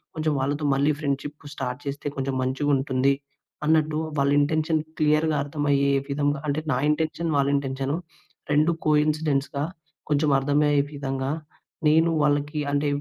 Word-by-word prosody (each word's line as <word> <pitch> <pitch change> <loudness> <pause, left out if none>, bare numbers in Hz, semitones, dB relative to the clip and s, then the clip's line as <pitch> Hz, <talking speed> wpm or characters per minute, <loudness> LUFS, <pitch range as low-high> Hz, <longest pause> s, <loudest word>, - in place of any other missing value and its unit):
కొంచెం 155 -1 0
వాళ్ళతో 145 +3 -1
మళ్ళీ 145 +2 +2
ఫ్రెండ్‌షిప్ 145 0 -3
స్టార్ట్ 125 0 -4
చేస్తే 140 +1 -4
కొంచెం 135 0 -2
మంచిగుంటుంది 135 0 +1 0.5
అన్నట్టు 155 -1 +3 0.2
వాళ్ళ 140 0 +3
ఇంటెన్షన్ 155 +2 +1 0.2
క్లియర్‌గా 155 +1 +3
అర్థమయ్యే 145 -1 +1 0.2
విధంగా, 145 0 0
అంటే 145 +2 0
నా - - +1
ఇంటెన్షన్, 160 +2 -1
వాళ్లింటెన్షన్ 140 -1 0 0.6
2 155 +3 +4 0.2
కోయిన్సిడెన్స్‌గా 150 -2 +1 0.5
కొంచెం 150 0 +2
అర్థమయ్యే 145 +1 +2
విధంగా 135 -2 -3 0.6
నేను 160 +2 +4
వాళ్ళకి 145 +1 +1
అంటే 145 +1 +1
145 Hz, 120 wpm, -25 LUFS, 140-150 Hz, 0.6 s, 2